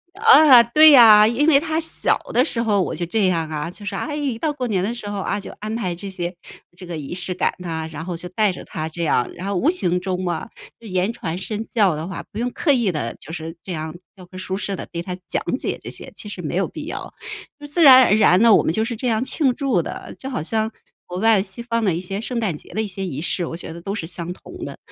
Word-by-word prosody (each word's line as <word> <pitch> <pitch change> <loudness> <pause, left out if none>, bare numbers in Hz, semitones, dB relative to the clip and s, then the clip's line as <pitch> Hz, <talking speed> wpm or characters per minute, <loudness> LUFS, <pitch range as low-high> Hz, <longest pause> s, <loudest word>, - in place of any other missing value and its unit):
啊， 315 - +8
对 305 +7 +7
呀， 220 -5 +9
因 240 +6 +1
为 280 -3 +6
他 315 0 -2
小 320 - +1 0.2
的 250 - +4
时 230 -7 -2
候 210 -4 +2
我 - - -2
就 175 +2 -3
这 200 +3 +1
样 165 -3 0
啊， 150 +1 -4
就 205 +3 -12
是， 200 - -4
哎， 295 +8 -3
一 280 -6 -2
到 305 +2 -1
过 260 -3 -4
年 195 -5 0
的 225 - -1
时 215 -4 -6
候， 205 - -4
啊， 195 - -2
就 - - -8
安 215 +1 -4
排 185 -7 -2
这 195 +3 -7
些 175 -1 -4 0.4
这 180 - -10
个 175 - -6
仪 145 0 -6
式 180 0 -4
感 - - 0
呐， 165 -3 -4
然 155 0 -6
后 180 -1 -4
就 180 +2 -8
带 210 +3 +1
着 - - -9
他 155 +1 -5
这 170 +2 -5
样， 125 -6 +1
然 180 - -8
后 200 0 -2
无 250 - +2
形 180 - +1
中 185 0 -3
嘛， 175 +1 -3 0.3
就 230 - -12
言 185 +3 0
传 170 -6 -5
身 210 +3 -4
教 200 -9 +2
的 160 - -5
话， 185 -3 -6
不 210 - -6
用 245 +1 -1
刻 295 - +1
意 235 -7 +2
地 115 -7 -3
就 160 - -10
是 165 0 -7
这 185 - -6
样 155 0 -5 0.2
教 185 -2 -13
科 185 +1 -12
书 185 0 -4
式 200 0 -3
地 - - -7
对 170 - -4
他 180 +1 -6
讲 - - -1
解 - - -3
这 - - -7
些， - - -8
其 210 - -8
实 - - -7
没 - - -4
有 - - +1
必 - - -8
要。 - - -6 0.5
就 295 - -10
自 330 +3 +2
然 260 -2 +10
而 - - +3
然 200 -3 +5
呢， 230 -3 +7
我 - - +3
们 - - +1
就 220 +6 0
是 235 - -4
这 250 +3 -3
样 220 +1 +1
庆 265 0 +2
祝 275 0 0
的， - - -8
就 265 - -7
好 255 - -3
像 220 +7 -1 0.4
国 180 +1 -5
外 220 -1 +4
西 190 +4 -4
方 230 -1 -2
的 190 - +2
一 165 - -2
些 195 +3 -5
圣 245 0 -3
诞 205 -8 -1
节 - - -12
的 215 - 0
一 220 - -3
些 195 0 -5
仪 145 -6 -5
式， 170 +2 -1
我 165 - -6
觉 165 - -7
得 170 - -10
都 195 +3 -4
是 180 -6 -4
相 170 0 -6
同 180 - -12
的。 - - -7
195 Hz, 300 characters per minute, -21 LUFS, 175-235 Hz, 0.5 s, 然